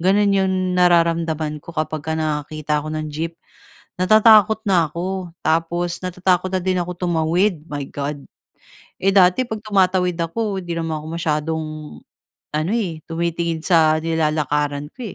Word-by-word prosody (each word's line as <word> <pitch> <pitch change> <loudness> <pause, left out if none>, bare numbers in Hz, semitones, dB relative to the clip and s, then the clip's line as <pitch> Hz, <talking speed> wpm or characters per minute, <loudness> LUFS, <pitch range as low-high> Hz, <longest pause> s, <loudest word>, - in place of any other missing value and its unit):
Gano'n 200 +3 +3
'yong 190 -1 +2 0.2
nararamdaman 165 -3 +2
ko 170 - -11
kapag 155 0 -2
ka 160 - -2
nakakita 150 -1 -2
ako 155 - -7
ng 155 0 -3
jeep. 165 +2 -4 0.7
Natatakot 215 +1 +6
na 175 -6 +3
ako 185 +2 -4 0.2
tapos 170 +2 0
natatakot 185 0 0
na - - +3
din 185 0 0
ako 175 +1 -4
tumawid, 170 +1 +1
my 145 -2 -4
God. 145 0 -5 0.7
Eh, 195 +1 +1
dati 190 +6 +4
'pag 220 -2 -5
tumatawid 185 -4 +1
ako 195 +4 -2
'di 175 -2 -5
naman 160 -1 -2
ako - - -10
masyadong 160 -1 -1 0.9
ano 155 +6 -1
eh, 175 -9 -2
tumitingin 170 -1 -2
sa 160 -3 +4
nilalakaran 150 -2 -1
ko 255 - -12
170 Hz, 145 wpm, -20 LUFS, 155-185 Hz, 0.9 s, Natatakot